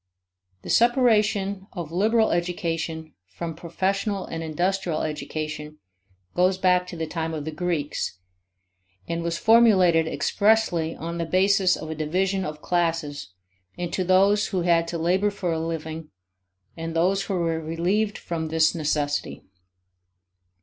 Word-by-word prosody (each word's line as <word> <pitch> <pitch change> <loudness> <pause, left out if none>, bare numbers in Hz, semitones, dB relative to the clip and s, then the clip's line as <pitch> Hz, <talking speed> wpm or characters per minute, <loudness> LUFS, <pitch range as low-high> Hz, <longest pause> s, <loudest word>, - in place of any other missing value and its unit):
The - - -4
separation 215 -5 +2
of 170 -4 -6
liberal 220 +5 +2
education 165 -2 -2
from 165 - -6
professional 195 +4 -2
and 165 - -5
industrial 175 +2 -1
education 155 0 -5 0.6
goes 185 +1 +2
back 180 -1 +2
to 180 - -8
the 165 - -2
time 160 0 -3
of 150 -2 -5
the 160 - -3
Greeks, 155 - -2 0.9
and 170 0 -2
was 170 0 -2
formulated 185 -7 +5
expressly 175 0 +1
on 170 +1 -5
the 170 - -1
basis 190 +2 +3
of 155 0 -7
a - - -1
division 185 +5 0
of 150 0 -7
classes 165 - -1 0.5
into 175 +1 -2
those 195 +3 +4
who 185 -3 -1
had 170 -1 +3
to 170 - -3
labor 185 +5 +2
for 200 -4 -3
a 160 - -1
living 160 -1 -5 0.7
and 165 0 -5
those 190 +4 +2
who 195 - -2
were 165 -2 0
relieved 180 +7 0
from 165 -2 -4
this 160 0 +3
necessity. 150 -3 -2
170 Hz, 135 wpm, -24 LUFS, 160-190 Hz, 0.9 s, formulated